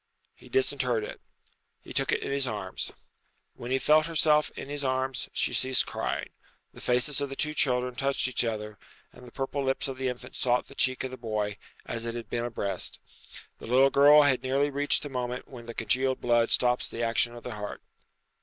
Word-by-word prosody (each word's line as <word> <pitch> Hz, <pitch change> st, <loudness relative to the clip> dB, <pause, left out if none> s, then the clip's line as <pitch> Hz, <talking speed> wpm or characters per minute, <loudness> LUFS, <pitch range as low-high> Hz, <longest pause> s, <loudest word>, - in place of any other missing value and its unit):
He -, -, -17 dB
disinterred 130 Hz, -4 st, +1 dB
it. -, -, -7 dB, 0.6 s
He -, -, -10 dB
took -, -, +1 dB
it -, -, 0 dB
in -, -, -3 dB
his 140 Hz, -1 st, 0 dB
arms. 105 Hz, -5 st, -4 dB, 0.6 s
When 120 Hz, -, -8 dB
she 130 Hz, -, +2 dB
felt 155 Hz, +3 st, +4 dB
herself 150 Hz, -2 st, +3 dB
in -, -, -7 dB
his 145 Hz, 0 st, -4 dB
arms 130 Hz, 0 st, -1 dB
she -, -, 0 dB
ceased 130 Hz, 0 st, +2 dB
crying. -, -, -3 dB, 0.4 s
The -, -, -12 dB
faces 130 Hz, +4 st, +1 dB
of 140 Hz, -, -2 dB
the 135 Hz, -, -6 dB
two 155 Hz, +2 st, -1 dB
children 125 Hz, -4 st, +2 dB
touched 135 Hz, +1 st, 0 dB
each 125 Hz, -, +1 dB
other, 105 Hz, -2 st, -4 dB, 0.3 s
and 125 Hz, -, -13 dB
the -, -, -12 dB
purple 135 Hz, +2 st, -3 dB
lips 135 Hz, +1 st, 0 dB
of 130 Hz, -1 st, -6 dB
the 130 Hz, -, 0 dB
infant 125 Hz, -1 st, -6 dB
sought 125 Hz, -1 st, +1 dB
the -, -, -13 dB
cheek 130 Hz, -2 st, +1 dB
of 130 Hz, -, -4 dB
the 130 Hz, -, -7 dB
boy, 105 Hz, -3 st, -2 dB, 0.3 s
as 115 Hz, 0 st, -4 dB
it 115 Hz, -, -3 dB
had 115 Hz, -2 st, -7 dB
been 120 Hz, 0 st, -1 dB
a -, -, -2 dB
breast. 100 Hz, -4 st, -3 dB, 0.6 s
The -, -, -9 dB
little 130 Hz, +3 st, +5 dB
girl 145 Hz, +2 st, +8 dB
had 130 Hz, -4 st, +3 dB
nearly 135 Hz, +3 st, +1 dB
reached 145 Hz, +1 st, +1 dB
the 145 Hz, -, -5 dB
moment 125 Hz, -1 st, -4 dB
when 120 Hz, -3 st, -11 dB
the 115 Hz, -, -7 dB
congealed 130 Hz, +4 st, +1 dB
blood 120 Hz, -1 st, +3 dB
stops 125 Hz, 0 st, +3 dB
the 115 Hz, -, -4 dB
action 115 Hz, +1 st, +1 dB
of 120 Hz, -, -10 dB
the 125 Hz, -, -5 dB
heart. 105 Hz, -1 st, -6 dB
130 Hz, 210 wpm, -28 LUFS, 120-135 Hz, 0.6 s, girl